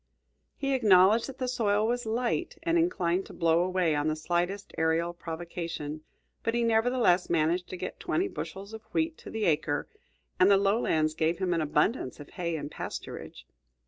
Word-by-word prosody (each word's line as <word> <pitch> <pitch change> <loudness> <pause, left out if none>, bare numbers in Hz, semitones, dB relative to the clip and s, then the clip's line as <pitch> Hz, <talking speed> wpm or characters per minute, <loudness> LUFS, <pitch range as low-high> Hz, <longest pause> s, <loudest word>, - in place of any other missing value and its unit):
He 275 -1 -1
acknowledged 210 -2 +5
that 270 -1 -8
the 255 - -2
soil 215 -4 +1
was 245 0 -1
light, 245 +9 -1
and 335 0 +1
inclined 195 - +1
to - - -11
blow 165 -1 +3
away 180 -3 +1
on 145 +1 0
the 155 - +1
slightest 175 +5 -2
aerial 165 +1 +1
provocation, 165 -2 -5 0.4
but 230 - -1
he 240 - +2
nevertheless 225 -5 +3
managed 170 +2 +1
to 185 - -6
get 185 +1 -6
twenty 350 +2 0
bushels 200 - -7
of 220 - -7
wheat 320 0 0
to - - -10
the 220 -1 -2
acre, 150 -2 +1 0.5
and 185 +2 +6
the 200 - +6
lowlands 195 -6 +2
gave 160 +2 0
him 185 -2 0
an 165 - +1
abundance 155 - 0
of 145 - -11
hay 170 -3 -3
and 145 -1 -5
pasturage. - - -7
185 Hz, 175 wpm, -29 LUFS, 165-230 Hz, 0.5 s, and